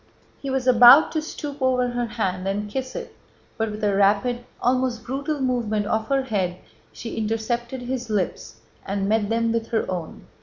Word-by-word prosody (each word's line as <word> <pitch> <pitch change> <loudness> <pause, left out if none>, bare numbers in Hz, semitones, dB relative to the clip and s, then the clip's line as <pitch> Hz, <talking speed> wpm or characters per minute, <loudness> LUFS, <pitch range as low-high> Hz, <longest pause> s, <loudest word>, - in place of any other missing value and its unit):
He 275 - -4
was 265 -1 -1
about 250 +4 +8
to 315 - -1
stoop 290 -2 -7
over 255 -1 +2
her 245 0 -2
hand 190 -5 -2
and 205 +2 -2
kiss 260 +2 -4
it, - - -7 0.4
but 225 -1 -1
with 210 0 -7
a 205 -1 +2
rapid, 205 +5 +2 0.2
almost 250 -1 0
brutal 280 +4 -3
movement 235 -5 0
of 220 +1 -1
her 275 -1 +1
head, 190 -7 -1 0.3
she 230 - -7
intercepted 235 +3 -2
his 245 -1 -4
lips 185 - -3 0.2
and 195 0 -2
met 210 -1 +1
them 230 0 +1
with 230 0 -1
her 225 - 0
own. 175 -3 -6
230 Hz, 180 wpm, -23 LUFS, 210-255 Hz, 0.4 s, about